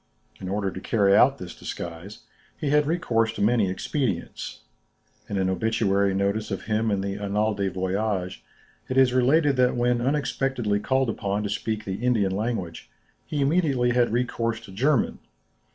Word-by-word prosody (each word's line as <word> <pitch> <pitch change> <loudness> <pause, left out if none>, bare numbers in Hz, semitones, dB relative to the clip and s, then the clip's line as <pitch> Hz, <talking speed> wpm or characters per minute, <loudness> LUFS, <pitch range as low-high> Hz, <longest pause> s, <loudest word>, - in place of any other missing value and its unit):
In 95 - -6
order 100 0 -1
to 95 - -7
carry 100 -3 +3
out 135 +5 +5
this 90 -8 -8
disguise, 85 +5 -7 0.4
he 145 - -2
had 150 0 +3
recourse 115 -9 +1
to - - -5
many 110 -3 +3
expedients. 130 +8 -3 0.7
In 100 - -2
an 95 -1 +1
obituary 100 0 +1
notice 100 +2 0
of 95 - -4
him 110 +1 0
in 100 -2 0
the 100 +1 -3
"Annales 105 +2 0
des 100 -1 0
Voyages," 95 0 -2 0.5
it 130 - -1
is 130 -2 +5
related 135 +3 +3
that 125 -1 +3
when 120 0 +1
unexpectedly 130 -5 0
called 130 +1 +1
upon 100 -1 -2
to 105 - -2
speak 110 +1 -3
the 95 +4 -4
Indian 105 -6 +2
language, 105 -6 -3 0.4
he 145 - -2
immediately 140 -5 +2
had 120 -1 +3
recourse 115 -1 -1
to 110 -4 -12
German. 125 +5 +1
110 Hz, 165 wpm, -25 LUFS, 100-125 Hz, 0.7 s, out